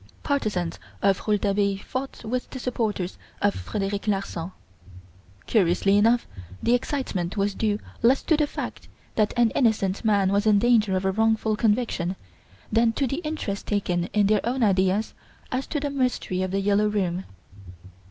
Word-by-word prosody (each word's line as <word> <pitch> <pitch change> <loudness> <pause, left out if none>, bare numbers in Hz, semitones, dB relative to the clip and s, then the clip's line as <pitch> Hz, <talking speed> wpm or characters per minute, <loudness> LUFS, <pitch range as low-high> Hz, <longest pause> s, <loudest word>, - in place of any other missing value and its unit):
Partisans 210 - -1 0.2
of 195 +1 +2
Rouletabille 200 -1 +1
fought 260 -2 -5
with 250 +3 -2
the - - -7
supporters 220 -7 -2 0.2
of 205 0 +2
Frederic 200 0 -3
Larsan. 195 -4 -2 0.9
Curiously 195 -1 +3
enough 230 +4 +4 0.4
the 235 - +3
excitement 230 - -1
was 200 0 +1
due 210 0 0 0.2
less 250 +4 +4
to 320 - +3
the 300 -1 +1
fact - - -6 0.3
that 215 -2 +2
an 235 -2 +4
innocent 215 -6 +1
man 200 -3 +3
was 200 +2 +2
in 210 -1 +6
danger 215 -3 +3
of 185 - -3
a 190 - +3
wrongful 220 +1 +1
conviction 210 -5 0 0.6
than 225 +1 +3
to 275 - 0
the 275 +2 -2
interest 305 - -4
taken 180 -4 0
in 205 +2 +1
their 210 0 +3
own 245 +2 0
ideas 190 +1 +2 0.4
as 255 +1 -2
to 300 - -2
the 285 0 -2
Mystery 250 -9 -1
of 185 - -1
"The 195 +1 0
Yellow 205 +1 +3
Room". 190 -3 -1
210 Hz, 160 wpm, -25 LUFS, 195-235 Hz, 0.9 s, in